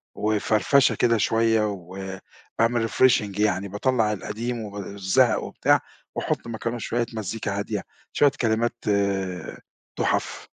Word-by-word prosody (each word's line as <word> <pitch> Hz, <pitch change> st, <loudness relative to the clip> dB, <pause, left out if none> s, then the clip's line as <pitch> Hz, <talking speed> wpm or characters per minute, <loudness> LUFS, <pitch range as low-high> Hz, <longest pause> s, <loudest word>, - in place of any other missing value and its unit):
وفرفشة 110 Hz, +5 st, +2 dB
كده 115 Hz, -1 st, +3 dB
شوية 115 Hz, 0 st, +2 dB
وباعمل 95 Hz, +5 st, -3 dB
refreshing 105 Hz, -6 st, +3 dB
يعني 100 Hz, -2 st, +1 dB
باطلّع 105 Hz, +1 st, +1 dB
القديم 115 Hz, +4 st, -4 dB
وب 105 Hz, -2 st, -7 dB
الزهق 100 Hz, +5 st, +1 dB
وبتاع -, -, +2 dB, 0.3 s
وأحط -, -, -2 dB
مكانة 115 Hz, +1 st, -3 dB
شوية 120 Hz, +1 st, -1 dB
مزيكا 105 Hz, -1 st, -3 dB
هادية، 100 Hz, -, -3 dB, 0.3 s
شوية 145 Hz, -2 st, +4 dB
كلمات 115 Hz, 0 st, +1 dB, 1.2 s
تُحف. -, -, 0 dB
110 Hz, 110 wpm, -24 LUFS, 100-115 Hz, 1.2 s, شوية